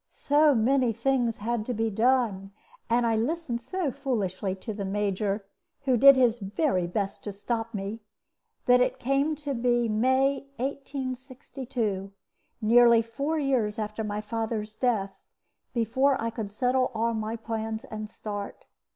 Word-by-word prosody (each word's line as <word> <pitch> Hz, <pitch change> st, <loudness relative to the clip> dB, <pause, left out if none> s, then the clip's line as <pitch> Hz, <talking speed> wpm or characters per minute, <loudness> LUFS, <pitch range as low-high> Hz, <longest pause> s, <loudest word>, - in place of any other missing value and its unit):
So 295 Hz, 0 st, +3 dB
many 245 Hz, +1 st, +3 dB
things 245 Hz, -1 st, 0 dB
had 230 Hz, +1 st, -2 dB
to 250 Hz, -, -1 dB
be 225 Hz, +1 st, 0 dB
done, 220 Hz, -3 st, +1 dB, 0.4 s
and 235 Hz, +1 st, +3 dB
I 225 Hz, -1 st, +2 dB
listened 245 Hz, +1 st, -1 dB
so 350 Hz, +2 st, -2 dB
foolishly 205 Hz, -9 st, -2 dB
to 215 Hz, +3 st, -6 dB
the 200 Hz, -1 st, -4 dB
Major 200 Hz, +1 st, -1 dB, 0.4 s
(who 260 Hz, -2 st, +3 dB
did 275 Hz, +3 st, +8 dB
his 245 Hz, -3 st, +3 dB
very 195 Hz, -, 0 dB
best 195 Hz, +2 st, -3 dB
to 205 Hz, -, -4 dB
stop 225 Hz, +3 st, -3 dB
me), 200 Hz, +3 st, -4 dB, 0.7 s
that 250 Hz, 0 st, +5 dB
it 250 Hz, -, +1 dB
came 275 Hz, +4 st, +1 dB
to 290 Hz, -1 st, -4 dB
be 240 Hz, -1 st, +1 dB
May, 260 Hz, +5 st, +2 dB
1862 255 Hz, -6 st, -4 dB, 0.5 s
(nearly 235 Hz, +1 st, +6 dB
four 280 Hz, +8 st, -2 dB
years 255 Hz, -8 st, 0 dB
after 215 Hz, 0 st, -3 dB
my 210 Hz, 0 st, -3 dB
father's 220 Hz, -1 st, -3 dB
death), 215 Hz, -5 st, 0 dB, 0.6 s
before 260 Hz, +4 st, +2 dB
I 230 Hz, 0 st, -2 dB
could 220 Hz, -3 st, -5 dB
settle 255 Hz, +4 st, +1 dB
all 230 Hz, +1 st, +1 dB
my 220 Hz, 0 st, -2 dB
plans 225 Hz, 0 st, -4 dB
and 215 Hz, -4 st, -7 dB
start. 205 Hz, -2 st, -6 dB
230 Hz, 145 wpm, -27 LUFS, 215-260 Hz, 0.7 s, did